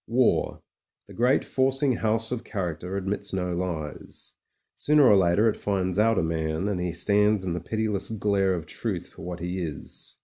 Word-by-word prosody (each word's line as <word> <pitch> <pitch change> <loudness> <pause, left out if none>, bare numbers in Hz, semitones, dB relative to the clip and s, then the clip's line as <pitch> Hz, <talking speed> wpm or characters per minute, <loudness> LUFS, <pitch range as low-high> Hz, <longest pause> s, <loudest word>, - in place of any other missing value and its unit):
War, 120 +2 +1 0.4
the - - -12
great 125 +4 +2
forcing 135 -1 +1
house 110 +1 0
of 125 -2 -3
character, 90 -3 -4
admits 100 +1 -3
no 90 -1 -1
lies. 85 -4 -5 0.4
Sooner 150 0 +4
or 105 - +7
later 95 +3 +4
it 110 - +2
finds 95 -2 -1
out 115 0 +3
a 95 - +2
man, 80 +2 -1
and 95 -4 -1
he 90 -1 -1
stands 105 +3 +2
in 90 - -1
the 90 - -2
pitiless 105 +3 -2
glare 100 -3 +1
of 85 -3 -5
truth - - -4
for - - -14
what 90 +1 -6
he 90 +2 -3
is. 80 -5 -7
95 Hz, 180 wpm, -26 LUFS, 90-110 Hz, 0.4 s, or